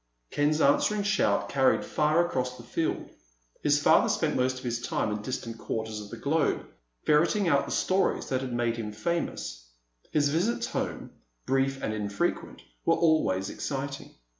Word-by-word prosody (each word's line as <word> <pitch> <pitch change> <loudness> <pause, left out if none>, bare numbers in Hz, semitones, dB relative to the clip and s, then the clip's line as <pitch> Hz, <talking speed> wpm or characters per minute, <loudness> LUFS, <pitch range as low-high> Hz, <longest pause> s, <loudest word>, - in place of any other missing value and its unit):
Ken's 150 +2 +1
answering 205 +9 +3
shout 205 0 +2
carried 135 -1 +2
far 155 +3 +2
across 125 -6 -2
the 120 - -11
field. 155 +7 -2 0.5
His - - +3
father - - +5
spent - - 0
most 130 0 +1
of 130 - -9
his 120 -1 -2
time 105 - -1
in 105 0 -3
distant 115 -1 -5
quarters 110 -1 -4
of 105 - -10
the - - -8
globe, 155 +3 0 0.4
ferreting 170 +6 +3
out 140 -4 +3
the - - -6
stories 190 +1 +1
that 130 0 0
had 130 -1 -4
made 120 -1 0
him 110 -2 -4
famous. 110 - -3 0.4
His 145 -2 +3
visits 180 +11 0
home, - - -4 0.3
brief 135 0 0
and 110 - -1
infrequent, 100 - -2 0.2
were - - +3
always 105 - +2
exciting. 140 0 -4
135 Hz, 165 wpm, -28 LUFS, 115-155 Hz, 0.5 s, father